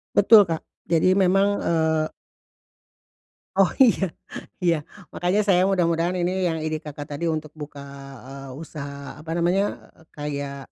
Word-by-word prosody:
Betul, 215 -4 +7
Kak. 165 -2 -3 0.2
Jadi 175 +3 +3
memang, 195 +1 +4 0.2
eee 160 -1 +1 1.4
Oh, 195 -2 +5
iya 230 -7 +5 0.6
iya. 170 -1 +4 0.4
Makanya 185 +4 +1
saya 180 -3 +4
mudah-mudahan 175 -1 +1
ini 175 +1 0 0.2
yang 160 - -2
ide 155 -1 -2
Kakak 145 -1 -7
tadi 165 +3 -2
untuk 155 -1 -3
buka, 145 -2 -9 0.4
eee, 135 0 -9
usaha 140 -3 -8
apa 160 - -12
namanya, 185 +4 0
eee, 160 - -22
kayak, 140 -1 -4
165 Hz, 135 wpm, -24 LUFS, 150-185 Hz, 1.4 s, Betul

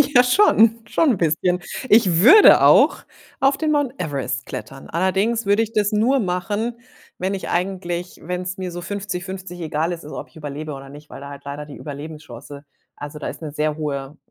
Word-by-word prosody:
Ja, 245 - +8
schon, 230 - +4
schon 305 +6 +2
'n 215 - 0
bisschen. 175 +2 +1 0.3
Ich 205 -7 +4
würde 410 - +8
auch - - +5 0.4
auf 270 +1 +3
den 310 -1 0
Mount 290 -4 +1
Everest 135 -5 -3
klettern. 135 - -8
Allerdings 195 +6 0
würde 205 +3 +3
ich 225 0 -2
das 210 -1 +1
nur 225 +6 +2
machen, 210 +5 -2 0.4
wenn 190 +2 -1
ich 190 - -6
eigentlich 180 -1 -3
wenn 180 +2 -3
es 185 +1 -5
mir 185 -1 -5
so 175 +1 -6
50-50 190 -2 -6
egal 160 +1 -1
ist 170 -1 -6
ob 150 - -8
ich - - -29
überlebe 150 0 -6
oder 135 0 -10
nicht, 145 +2 -14
weil - - -9
da 140 - -8
halt 140 0 -10
leider 145 +1 -6
die 145 - -10
Überlebenschance 145 -2 -9 0.3
also, 145 +1 -7
da - - -5
ist - - -7
'ne 150 - -5
sehr 150 +1 -1
hohe 145 -1 -4
180 Hz, 195 wpm, -21 LUFS, 150-210 Hz, 0.4 s, Ja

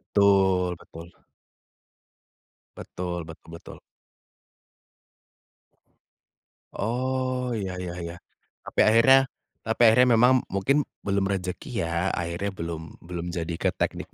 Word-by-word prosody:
Betul 95 -3 +4
betul. 85 +1 -13 1.6
Betul 90 -1 -5
betul 80 0 -13
betul. 85 - -11 3.0
Oh, 125 +2 -2
iya 95 -4 -4
iya 90 -1 -5
iya. 85 0 -6 0.5
Tapi - - -5
akhirnya 115 +5 +6 0.5
tapi 110 +2 -2
akhirnya 125 +3 +5
memang, 125 +3 +5 0.2
mungkin 140 +9 +2 0.2
belum 100 0 0
rezeki, 95 -2 -3
ya? 85 +3 -1
Akhirnya 90 +3 -3
belum 85 -3 -5 0.2
belum 85 0 -6
jadi 85 0 -3
ke - - +1
teknik - - -3
95 Hz, 100 wpm, -26 LUFS, 85-115 Hz, 3.0 s, akhirnya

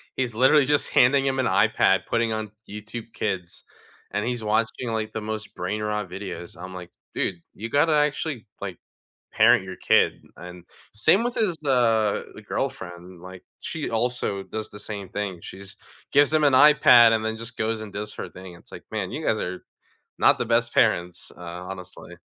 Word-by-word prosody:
he's 125 -4 -2
literally 135 +4 +5
just 145 +1 +1
handing 135 +2 +4
him 135 -1 0
an 130 - +1
iPad, - - +3
putting 115 -1 +1
on 110 -1 -4 0.2
YouTube 110 +2 -8
Kids, 90 -5 -4 0.5
and 105 +2 -1
he's 120 -1 -2
watching, 110 +3 0
like, 110 -1 -2
the 110 - -3
most 110 -1 -5
brain 100 +4 -3
rot 105 -2 -2
videos, 90 -2 -7
I'm 95 +1 -8
like, 90 -1 -9 0.2
"Dude, 85 - -2
you 115 +3 -6
gotta 150 +4 +3
actually, 150 -4 0 0.2
like, 95 -4 -5 0.5
parent - - +5
your 95 -1 -7
kid." - - +2
And, 90 -1 -11 0.3
same 185 - +4
with 245 0 -2
his, 190 -7 0
uh 115 -6 +2
the - - -10
girlfriend. 90 0 -5
Like, 95 0 -11 0.2
she 160 -2 -4
also 115 -4 -1
does 110 +1 -6
the 105 - -11
same 100 -2 -6
thing, 100 -3 -4
she 95 - -10
just 100 0 -11 0.3
gives 145 +2 +4
him 155 -1 +3
an 145 -2 +4
iPad, 125 -5 +7
and 110 -1 0
then 110 0 -2
just 115 0 -9
goes 110 0 -1
and 105 -2 -9
does 105 +1 -5
her - - -6
thing. 95 -1 -11
It's 85 - -16
like, - - -9
"Man, 105 -4 -3
you 150 +5 -5
guys 110 - +1
are 90 0 -5 0.5
not - - +4
the - - -1
best 115 +1 +1
parents, 90 -6 +1
uh, - - -13
honestly." 90 +1 -9
110 Hz, 190 wpm, -24 LUFS, 95-125 Hz, 0.5 s, iPad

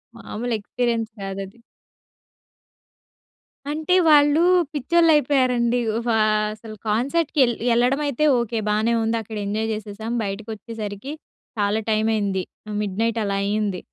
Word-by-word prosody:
మాములు 240 +2 -5
ఎక్స్‌పి‌రియన్స్ 230 +1 -2
కాదది. 195 +2 -6 2.1
అంటే 315 +4 +1
వాళ్ళు 295 +1 +5 0.3
పిచ్చోళ్ళయిపోయారండి. 270 -6 +3 0.3
వా 225 -2 +2 0.4
అసలు 215 0 -10
కాన్సర్ట్‌కి 280 +9 0
యెల్ 240 -2 +1
యెళ్ళడమైతే 270 +4 +2
ఓకే. 235 -1 -2
బానే 215 +2 +1
ఉందక్కడ, 225 -1 -2
ఎంజాయ్ 215 +2 -2
చేసేసాం, 215 +1 -6
బయటకొచ్చేసరికి 215 +3 -6 0.5
చాలా 205 +1 +1
టైమయింది. 215 -3 +1 0.4
మిడ్‌నైట్ 225 +3 -1
అలా 200 -1 -1
అయింది. 205 -2 -1
225 Hz, 95 wpm, -22 LUFS, 210-250 Hz, 2.1 s, వాళ్ళు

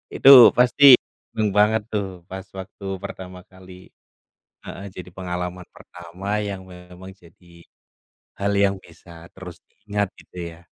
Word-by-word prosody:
Itu 135 - +4 0.3
pasti 125 +3 +2 0.5
seneng 110 -1 -1
banget 110 +1 +3
tuh, 105 -2 -2 0.2
pas 95 +1 -8
waktu 95 +1 -11 0.2
pertama 95 -2 -9
kali. 95 0 -16 0.9
Heeh, 100 - -9
jadi 90 -1 -10
pengalaman 90 -1 -6
pertama 90 +2 -13 0.2
yang 95 -1 -7
memang 90 +1 -13
jadi 85 +1 -22 0.9
hal 100 +1 -1
yang 100 0 +1
bisa 85 0 -20 0.2
terus 90 -2 -11
diingat, 105 -1 -4
gitu, - - -21 0.2
ya? 80 - -17
95 Hz, 130 wpm, -21 LUFS, 90-100 Hz, 0.9 s, Itu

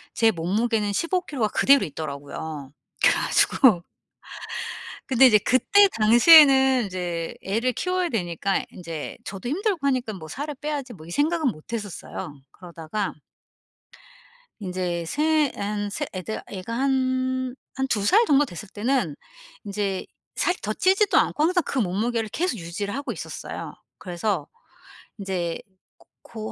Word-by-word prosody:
제 225 -1 +4
몸무게는 210 +4 0
15 335 - 0
킬로가 255 -11 -2
그대로 275 -2 +4
있더라고요. 145 -1 -7 0.3
그래 - - +6
가지고 215 -11 +3 1.2
근데 265 0 +6
이제 215 -4 +6
그때 260 - +4
당시에는 265 +2 +7
인제 175 -3 -4
애를 230 +6 0
키워야 365 +6 -1
되니까 190 - -1
이 - - -6
인제 165 -4 -7
저도 195 +4 -6
힘들고 365 - -1
하니깐 255 -6 0
뭐 160 -3 -10
'살을 290 - -5
빼야지.' 290 -4 -4
뭐 165 -8 -12
이 - - -10
생각은 310 - +1
못 175 -1 -7
했었어요. 200 -9 -6
그러다가 175 +3 -5 1.5
인제 180 -3 -3
세 300 - +2
한 205 0 -3
세 - - -3
애들 185 +3 -5
애가 190 +3 -6
한 260 -1 0 0.2
한 265 0 -1
2 210 -6 0
살 430 - +5
정도 290 -3 +4
됐을 205 - -9
때는 210 - -1 0.5
인제 200 -2 -2 0.3
살 360 - +1
더 215 - -1
찌지도 385 - +3
않고 295 - +1
항상 355 +2 +2
그 275 - -3
몸무게를 220 +2 0
계속 340 - -1
유지를 185 +5 -5
하고 280 +2 -3
있었어요. - - -7 0.3
그래서 180 -3 -2 0.7
인제 185 -4 -3 0.6
고 220 -1 -7
220 Hz, 280 characters per minute, -24 LUFS, 185-270 Hz, 1.5 s, 당시에는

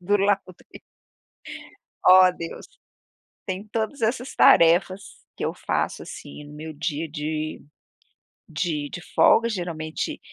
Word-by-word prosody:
do 200 +3 +2
laundry. 195 -2 -2 1.2
Oh, 185 0 +8
Deus! 165 - -7 0.8
Tem 190 +1 -4
todas 225 +5 -3
essas 245 +3 -1
tarefas 175 +3 +5 0.4
que - - -3
eu - - -2
faço, - - -2
assim, 70 - -10
no 145 - -13
meu 155 +1 -8
dia 155 +1 -3
de 155 0 -4 0.9
de 155 -3 -3
de 175 - -7
folga. 230 - +5
Geralmente, 170 -6 -4
175 Hz, 115 wpm, -24 LUFS, 155-200 Hz, 1.2 s, Oh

